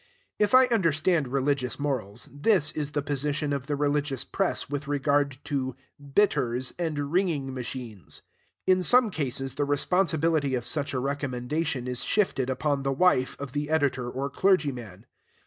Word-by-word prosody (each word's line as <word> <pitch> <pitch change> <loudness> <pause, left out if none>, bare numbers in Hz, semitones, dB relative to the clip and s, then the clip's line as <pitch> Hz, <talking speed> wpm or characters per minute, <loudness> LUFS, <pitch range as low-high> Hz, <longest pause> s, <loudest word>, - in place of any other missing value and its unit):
If 210 +3 +4
I 260 0 +8
understand 165 - +2
religious 135 -1 0
morals, 125 -6 -2
this 155 +1 +3
is 150 -1 -4
the 145 -1 -1
position 145 +1 -1
of 140 -1 -3
the 145 - 0
religious 145 -2 0
press 195 -2 -1
with 145 +1 -4
regard 140 -1 +1
to 130 -3 -2 0.4
bitters 130 - +2
and 150 -4 -2
wringing 160 -8 0
machines. 120 -5 -6 0.4
In 185 0 +4
some 235 +5 +5
cases, 135 -5 -2
the 145 - -1
responsibility 155 -1 +1
of 120 -1 -3
such 140 +1 -2
a - - +1
recommendation 140 0 -2
is 125 -1 -1
shifted 160 -11 +1
upon 140 +2 0
the 135 0 -1
wife 135 -3 +2
of 140 -2 -6
the 145 +2 -3
editor 140 -5 +1
or 135 +3 -3
clergy 185 -7 +3
man. 110 -5 -10
145 Hz, 155 wpm, -27 LUFS, 130-155 Hz, 0.4 s, I